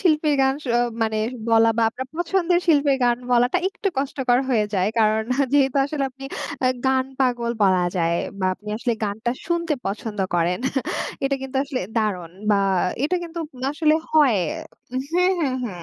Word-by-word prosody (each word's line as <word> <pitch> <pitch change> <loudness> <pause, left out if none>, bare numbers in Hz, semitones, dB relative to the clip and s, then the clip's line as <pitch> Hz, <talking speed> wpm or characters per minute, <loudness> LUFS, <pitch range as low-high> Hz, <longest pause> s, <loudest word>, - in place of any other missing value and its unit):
শিল্পীর 305 -4 +3
গান 265 0 +3
স - - -14 0.4
মানে 220 -1 0 0.3
বলা 225 0 +5
বা 230 - +2
আপনার 260 +3 -6
পছন্দের 350 0 +1
শিল্পীর 285 -4 +4
গান 240 -1 +3
বলাটা 245 +7 +3
একটু 395 +1 -3
কষ্টকর 265 -3 +1
হয়ে 225 -5 +2
যায়। 190 0 +2
কারণ 220 0 +3 0.3
যেহেতু 275 -2 +3
আসলে 285 -1 -2
আপনি 270 +1 -12 0.4
আ - - +5 0.2
গান 265 0 +3 0.2
পাগল 240 -2 +1
বলা 185 -2 +4
যায় 170 -1 +1 0.2
বা 190 - +1
আপনি 210 +3 -13
আসলে 235 +1 -1
গানটা 215 +3 -2 0.2
শুনতে 340 -2 0
পছন্দ 210 +2 -4 0.2
করেন 175 +1 +1 0.7
এটা 275 0 +1
কিন্তু 265 0 -5
আসলে 275 -3 -3 0.2
দারুণ 185 -7 -1 0.2
বা 205 - +4 0.5
এটা 355 +5 +1
কিন্তু 340 0 -7 0.3
আসলে 305 0 +3 0.2
হয় 285 -9 +5 0.5
হু, 255 - -5 0.2
হু, 360 +1 +4 0.4
হু 245 - -2
255 Hz, 165 wpm, -23 LUFS, 220-300 Hz, 0.7 s, বলা